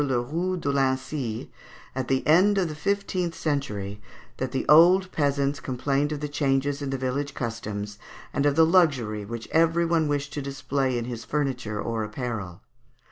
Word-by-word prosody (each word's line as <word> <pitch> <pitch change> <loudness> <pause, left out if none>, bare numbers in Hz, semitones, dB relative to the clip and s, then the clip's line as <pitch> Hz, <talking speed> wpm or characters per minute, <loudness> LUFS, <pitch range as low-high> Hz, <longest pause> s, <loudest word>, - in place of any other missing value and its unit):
Le 130 -4 +1
Roux 170 +9 -2
de 145 -5 -1
Lincy, 130 -3 -1 0.4
"at 130 -1 -3
the 130 0 0
end 190 +6 +5
of 185 -3 +2
the 155 - -5
fifteenth 180 0 -1
century 105 -10 -3 0.4
that 130 -1 -3
the 135 - -2
old 180 +5 +6
peasants 140 -1 0
complained 135 +3 -1
of 150 -1 -3
the 150 - -2
changes 140 0 0
in 140 - -3
the 135 - -1
village 135 +2 -2
customs, 105 -3 -4 0.3
and 140 - +2
of 145 - +2
the 160 +1 +6
luxury 140 - +2
which 115 +2 -6
every 165 +1 +3
one 165 -2 +2
wished 145 0 -2
to 145 - -3
display 135 -1 -1
in 120 - -2
his 120 -2 -5
furniture 125 -8 -2
or 115 0 -2
apparel. 105 -5 -5
140 Hz, 175 wpm, -26 LUFS, 120-155 Hz, 0.4 s, old